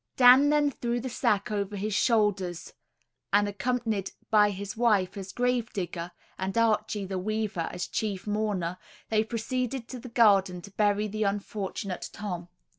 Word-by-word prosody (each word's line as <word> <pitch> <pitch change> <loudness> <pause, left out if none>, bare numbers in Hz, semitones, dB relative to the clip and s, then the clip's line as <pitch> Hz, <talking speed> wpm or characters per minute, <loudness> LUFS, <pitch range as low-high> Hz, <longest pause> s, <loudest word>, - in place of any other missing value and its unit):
Dan 260 +3 +8
then 295 -1 +3
threw 240 -2 -2
the 260 +2 -4
sack 215 -5 +1
over 205 -1 -2
his 205 +2 -2
shoulders, 205 -7 +1 0.6
and 205 +1 +4
accompanied 215 -1 -1 0.2
by 210 -1 +6
his 200 0 -5
wife 215 -6 +2
as 195 -1 -6
grave 245 -1 0
digger, 175 -2 -4 0.3
and 190 +3 -2
Archie 215 -2 +1
the 190 0 -3
weaver 215 -3 -2
as 175 - -3
chief 205 -4 -3
mourner, 205 -5 -1 0.3
they 215 -1 +3
proceeded 240 +2 -3
to 255 - -6
the 250 - -9
garden 200 -6 +4
to 200 - -11
bury 205 +1 +1
the 215 +1 -5
unfortunate 200 -1 -3
Tom. 180 -4 -5
210 Hz, 155 wpm, -28 LUFS, 195-230 Hz, 0.6 s, Dan